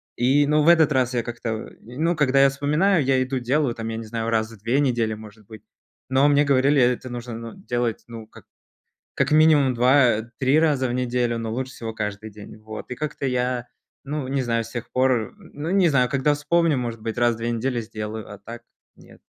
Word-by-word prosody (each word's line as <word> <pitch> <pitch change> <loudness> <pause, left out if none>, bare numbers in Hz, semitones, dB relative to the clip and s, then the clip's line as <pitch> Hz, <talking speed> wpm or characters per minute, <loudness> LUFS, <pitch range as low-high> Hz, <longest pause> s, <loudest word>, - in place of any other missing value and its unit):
И, 135 +4 +3
ну 150 +1 +3
в 160 - +5
этот 160 -3 +5
раз 125 -1 +1
я 120 - +1
как-то, 115 -2 -5
ну, 155 +9 -2
когда 135 -3 +3
я 140 - +6
вспоминаю, 150 +5 +1
я 130 -1 +2
иду 130 0 -3
делаю, 125 0 0
там, 115 0 -5
я 115 - -4
не 115 - -6
знаю, 115 +1 -3
раз 110 -1 0
в 115 - -13
2 120 +6 0
недели, 120 -6 +1
может 105 -1 -14
быть, 110 -2 -12 0.5
но 130 +2 +3
мне 145 0 +3
говорили, 140 0 +3
это 125 +1 +1
нужно, 120 -1 -6
ну, 115 0 -8
делать, 120 - -3
ну, 115 -2 -9
как - - -17 0.7
как - - 0
минимум 150 -4 +5
2-3 125 +1 +2
раза 145 -5 +1
в 120 - -3
неделю, 125 -1 -1
но 115 -1 -4
лучше 130 +2 -4
всего 115 -2 -7
каждый 105 0 -5
день. 105 +1 -12
Вот, 110 +2 -9
и 125 - -5
как-то 150 -2 -5
я, 125 -1 -1 0.4
ну, 140 -1 -4
не 135 0 -1
знаю, 115 -1 -1
с 115 - -11
тех 120 -1 -6
пор, 130 - +1
ну, 165 -4 -7
не 190 -2 +4
знаю, 125 -5 +2
когда 140 +2 +1
вспомню, 160 +1 +1
может 120 -2 -4
быть, 110 0 -5
раз 120 -1 +3
в - - -11
2 115 +1 -2
недели 120 +1 -1
сделаю, 110 -1 -7
а 100 - -10
так 115 +4 -10 0.3
нет. - - -18
125 Hz, 215 wpm, -23 LUFS, 115-140 Hz, 0.7 s, я